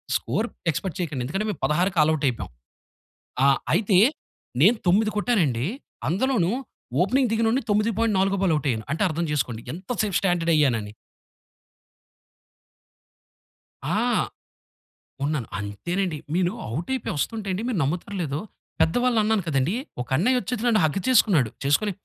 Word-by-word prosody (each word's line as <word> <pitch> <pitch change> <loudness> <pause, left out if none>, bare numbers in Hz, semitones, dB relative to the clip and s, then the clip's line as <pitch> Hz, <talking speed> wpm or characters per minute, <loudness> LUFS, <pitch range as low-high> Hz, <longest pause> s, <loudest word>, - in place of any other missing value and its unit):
Score 225 - -1 0.2
expect 160 +2 -4
చెయకండి. 145 -7 -3
ఎందుకంటే, 195 +9 -2
మేము 175 - -8
16కి 175 +5 +1
ఆలవుటయిపోయాం. 150 - 0 0.9
ఆ! - - +6 0.3
అయితే, 195 0 +3 0.6
నేను 215 +8 +6
9 215 +4 +4
కొట్టానండీ, 165 - +1 0.4
అందులోనూ 200 -1 +1 0.5
ఓపెనింగ్ 255 +7 +2
దిగినోడిని 225 +3 +2
తొమ్మిది 210 +2 +2
పాయింట్ 225 -2 +2
నాలుగో 195 +1 +1
బాల్ 180 -4 +3
అవుటయ్యాను. 130 -7 -1
అంటే, 160 - -1
అర్థం 170 +1 -2
చేసుకోండి 120 -6 -2
ఎంత 185 +3 -11
సేపు 205 -4 -1
స్టాండర్డయ్యానని. 155 - +1 2.9
ఆ! - - -1 1.3
ఉన్నాను. 145 -6 -1
అంతేనండి. 170 - -3 0.2
మీను 180 0 +2 0.2
ఔటయిపోయొస్తంటే 210 - -2
అండి, 190 +4 -2
మీరు 245 -5 -1
నమ్ముతారో 175 +8 -3
లేదో, 145 -1 -3 0.4
పెద్ద 160 - +3
వాళ్ళన్నాను 220 -4 +2
కదండీ, 140 +3 +1 0.3
ఒకన్నయ్యొచ్చేసి 225 - 0
నన్ను 220 -4 +4
హగ్ 155 +5 0
చేసుకున్నాడు. 190 - +4
చేసుకొని 145 +10 +2
180 Hz, 115 wpm, -24 LUFS, 150-215 Hz, 2.9 s, ఆ